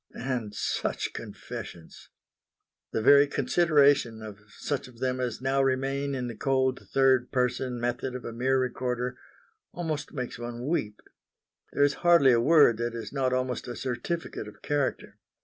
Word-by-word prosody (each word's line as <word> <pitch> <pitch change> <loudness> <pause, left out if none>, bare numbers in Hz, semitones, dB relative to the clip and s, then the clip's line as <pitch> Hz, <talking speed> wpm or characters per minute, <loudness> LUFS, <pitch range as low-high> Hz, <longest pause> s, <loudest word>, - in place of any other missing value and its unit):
And 120 -5 -3
such - - -2
confessions! 85 -2 -9 0.8
The 110 - -1
very 140 +2 +7
consideration 145 -8 +3
of 105 -2 -9 0.2
such 145 -3 -3
of 125 -2 -16
them 130 +1 -1
as 125 -2 -3
now 135 +1 +2
remain 135 +1 0
in 125 -1 -3
the 120 - -5
cold 130 +3 0
third 130 -2 +3
person 125 -1 -1
method 120 +2 -2
of 125 - -7
a 115 - -5
mere 130 +3 +1
recorder, 125 -1 -2 0.6
almost 155 -4 -4
makes 125 -4 -5
one 120 +1 -6
weep; 110 -10 -2 0.7
there 145 - +2
is 145 0 +3
hardly 170 -6 +6
a 120 -1 +4
word 145 -4 +5
that 120 0 -3
is 115 +2 -6
not 130 -2 0
almost 130 -1 -2
a 120 - -5
certificate 130 0 -4
of 105 - -14
character. 145 -2 -2
130 Hz, 155 wpm, -27 LUFS, 120-140 Hz, 0.8 s, very